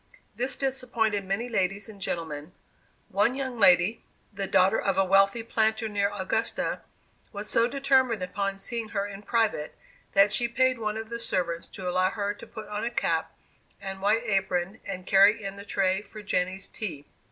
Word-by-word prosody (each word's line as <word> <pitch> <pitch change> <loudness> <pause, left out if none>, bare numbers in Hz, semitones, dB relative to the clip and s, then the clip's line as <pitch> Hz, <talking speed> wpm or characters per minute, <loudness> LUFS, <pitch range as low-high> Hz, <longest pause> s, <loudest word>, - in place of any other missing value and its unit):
This 255 +1 0
disappointed 235 -6 -1
many 195 +5 -1
ladies 200 -3 -1
and 205 -3 -12
gentlemen. 160 -3 -4 0.6
One 205 +6 +2
young 260 -3 -4
lady, 185 +2 +5 0.3
the 195 -1 -3
daughter 190 +4 +4
of 195 - 0
a 195 - +4
wealthy 195 +4 +4
planter 220 0 +1
near 200 -1 +1
Augusta, 205 +3 -1 0.5
was 205 +1 -5
so 230 +2 +3
determined 260 -5 +2
upon 195 +1 -2
seeing 225 +3 -3
her 200 - +1
in 200 -1 -8
private, 215 -9 0 0.4
that 195 +1 +5
she 240 +2 +2
paid 255 +1 +2
one 215 -1 -2
of 220 0 -6
the 235 0 -4
servants 170 -6 -2
to 185 - -7
allow 185 +1 +2
her 205 0 -2
to - - -12
put 220 -1 -9
on 210 0 -4
a 235 - 0
cap 165 -8 -1 0.4
and 195 -1 -6
white 215 +4 +2
apron, 195 -1 0
and 185 0 -5
carry 200 +3 +5
in 195 0 -5
the 200 - -8
tray 195 -1 +1
for 210 +1 -11
Jenny's 190 -1 -1
tea. 160 -10 -6
200 Hz, 175 wpm, -27 LUFS, 190-225 Hz, 0.6 s, lady